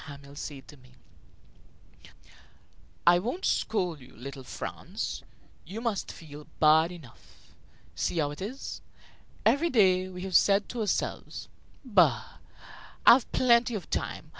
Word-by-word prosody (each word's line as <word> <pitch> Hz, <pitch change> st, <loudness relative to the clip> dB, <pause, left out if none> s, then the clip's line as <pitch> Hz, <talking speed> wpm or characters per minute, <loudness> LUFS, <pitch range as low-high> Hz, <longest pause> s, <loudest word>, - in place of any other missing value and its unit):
Hamel 140 Hz, -1 st, -11 dB
say 145 Hz, -1 st, -6 dB
to 145 Hz, -, -16 dB
me: 125 Hz, -1 st, -20 dB, 2.1 s
"I 175 Hz, 0 st, +7 dB
won't 245 Hz, -, -3 dB
scold 180 Hz, -8 st, 0 dB
you, 125 Hz, -, -16 dB
little 135 Hz, +2 st, -8 dB
Franz; -, -, -5 dB, 0.4 s
you 195 Hz, +7 st, -7 dB
must 230 Hz, -4 st, -2 dB
feel 150 Hz, -2 st, -11 dB
bad 160 Hz, +2 st, +5 dB
enough. 155 Hz, -10 st, -15 dB, 0.4 s
See -, -, -2 dB
how 145 Hz, -2 st, +1 dB
it 145 Hz, -, -9 dB
is! 235 Hz, +8 st, -6 dB, 0.6 s
Every 330 Hz, +5 st, +3 dB
day 185 Hz, -, +3 dB
we 180 Hz, 0 st, -7 dB
have 190 Hz, -1 st, -3 dB
said 200 Hz, 0 st, +4 dB
to 240 Hz, -, -4 dB
ourselves: 210 Hz, -, -2 dB, 0.4 s
'Bah! 170 Hz, -, +2 dB, 0.7 s
I've 245 Hz, +1 st, +7 dB
plenty 240 Hz, -1 st, +4 dB
of 195 Hz, -, -7 dB
time. -, -, -3 dB
180 Hz, 130 wpm, -28 LUFS, 145-220 Hz, 2.1 s, I